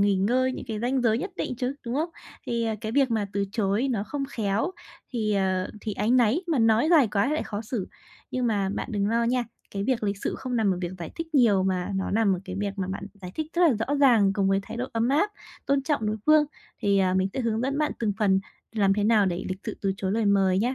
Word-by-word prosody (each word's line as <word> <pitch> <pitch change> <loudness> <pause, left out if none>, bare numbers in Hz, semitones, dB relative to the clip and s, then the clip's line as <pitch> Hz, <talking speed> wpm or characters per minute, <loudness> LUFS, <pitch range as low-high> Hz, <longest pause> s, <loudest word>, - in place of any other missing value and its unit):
nghỉ 200 0 +4
ngơi, 250 +7 +2
những - - -6
cái 215 -1 -3
ranh 250 +2 0
giới 230 -1 +3
nhất 390 - -4
định 250 - -2
chứ, 255 +1 -2
đúng 235 - -2
không? 310 +5 0 0.4
Thì, 235 -1 0
ờ, 225 - 0
cái 220 0 -4
việc 270 -2 +3
mà 215 -3 0
từ 200 0 0
chối 210 +4 +1
nó 210 -4 -1
không 275 +6 -3
khéo 220 - -1 0.4
thì, 215 -3 0
ờ, 185 -1 0
thì 215 - -3
áy 210 +3 -1
náy, 250 - +3
mà 325 -5 +1
nói 225 +5 +4
dài 295 -9 +6
quá 205 +2 +1
thì - - 0
lại - - -1
khó 205 - -4
xử. 220 -4 -4 0.4
Nhưng 255 -1 -1
mà 200 -4 +1
bạn - - -4
đừng 200 -1 0
lo 230 +1 +2
nha, 245 +1 +1 0.3
cái 200 0 -3
việc 255 -2 0
lịch 200 -1 0
sự - - -2
không 250 -2 -3
nằm 215 -3 +2
ở 180 - -6
việc 175 0 -3
giải 165 - -6
thích 325 -1 -7
nhiều, 215 -8 +5
mà 185 +1 -1
nó 190 0 -1
nằm 210 -2 +3
ở 175 - -8
cái 185 0 -6
việc 205 0 -1
mà 190 - -1
bạn 195 +1 -5
giải 180 - -7
thích 315 - -2
rất 355 - +3
là 320 -7 +5
rõ 285 - 0
ràng 235 -9 +5
cùng 195 -1 +1
với 195 0 +2
thái - - -8
độ 250 - -2
ấm 230 +1 +1
áp, 310 +10 +2 0.4
tôn 275 -1 +2
trọng 280 -8 0
đối 215 - 0
phương. 305 0 +6 0.4
Thì, 200 -1 +3
à, 185 -1 +2
mình 190 0 +2
sẽ 265 - -2
hướng 225 -2 0
dẫn 275 +3 -1
bạn 300 -1 +1
từng 215 -3 0
phần 195 -2 +3 0.3
làm 200 -3 +3
thế 205 0 0
nào 215 -3 +4
để 175 -1 -2
lịch 185 - -3
sự 215 - -4
từ 195 -1 0
chối 190 0 -2
lời 225 0 +1
mời 195 -2 +3
nhá. 245 +6 +1
220 Hz, 275 wpm, -26 LUFS, 195-255 Hz, 0.4 s, dài